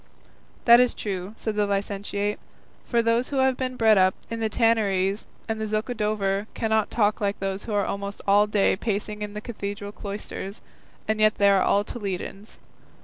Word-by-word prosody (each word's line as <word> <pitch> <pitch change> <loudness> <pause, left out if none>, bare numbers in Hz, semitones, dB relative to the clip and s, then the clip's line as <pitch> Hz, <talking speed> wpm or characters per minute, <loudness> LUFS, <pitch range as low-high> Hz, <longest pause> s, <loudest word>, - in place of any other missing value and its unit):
"That 235 0 +9
is 250 -1 +3
true," 195 -1 -4
said 220 -2 -3
the 210 -1 +1
licentiate, 200 +1 -2 0.5
"for 235 -1 +2
those 230 +2 +1
who 285 - -4
have 265 -1 +3
been 255 0 -3
bred 220 -4 +5
up 185 0 +4 0.2
in 230 - -3
the 220 -1 0
Tanneries 205 -3 +1 0.2
and 220 -1 -2
the 220 - -1
Zocodover 215 -2 -1
cannot 220 -1 +1
talk 215 0 +1
like 200 0 0
those 195 0 -3
who 220 - -4
are 200 - +2
almost 200 0 -4
all 205 +1 +5
day 210 -2 +2
pacing 210 +1 -3
the 210 - -5
cathedral 205 -3 -5
cloisters, 200 -1 -6 0.5
and 215 0 0
yet 215 0 +4
they 200 0 +4
are 195 -1 +4
all 200 +2 +3
Toledans. 200 -1 -6
210 Hz, 175 wpm, -25 LUFS, 200-220 Hz, 0.5 s, That